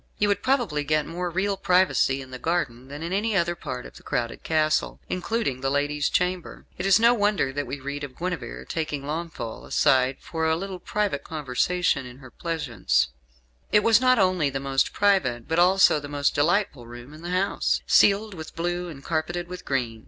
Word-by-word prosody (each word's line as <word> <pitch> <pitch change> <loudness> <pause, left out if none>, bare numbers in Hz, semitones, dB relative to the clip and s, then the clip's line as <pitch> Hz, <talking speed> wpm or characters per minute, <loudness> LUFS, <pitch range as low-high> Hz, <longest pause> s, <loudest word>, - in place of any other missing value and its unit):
You 205 - +2
would 200 0 +1
probably 235 - +1
get 150 +1 +1
more 175 +2 -3
real 195 +3 0
privacy 180 -8 +2
in 130 - -14
the 130 - -7
garden 135 -7 -2
than 145 +3 -7
in 170 +2 -3
any 210 +1 +1
other 170 -1 +1
part 125 -7 -6
of - - -12
the - - -14
crowded 115 -1 -3
castle, 155 -1 +1
including 185 - -2
the 135 - 0
lady's 145 +1 0
chamber. 180 -1 -2
It 185 - -2
is 195 +2 +6
no 235 +1 +6
wonder 205 - +1
that 145 -1 -3
we 140 +3 -5
read 140 +2 -5
of 135 -3 -7
Guenevere 180 0 -4
taking 150 -4 -3
Launfal 155 -6 -5
aside 130 0 +2
for 160 -1 -2
a 160 - +3
little 190 +1 -5
private 205 -9 -2
conversation 150 0 0
in 125 0 -12
her 130 -2 -13
pleasaunce. 120 - 0 0.6
It 210 - +5
was 230 +1 +5
not 255 0 +5
only 185 -7 +2
the 135 0 -3
most 135 0 0
private, 180 - +1
but 160 +1 +1
also 180 -3 +5
the 145 - -8
most 145 0 0
delightful 145 - +1
room 120 +4 -11
in 155 - -12
the 175 - -6
house 185 +2 0
ceiled 205 +1 +4
with 160 -3 -9
blue 175 +1 -2
and 140 -4 -10
carpeted 170 +2 -2
with 180 0 -8
green. 120 -5 -2
160 Hz, 195 wpm, -25 LUFS, 135-185 Hz, 0.6 s, is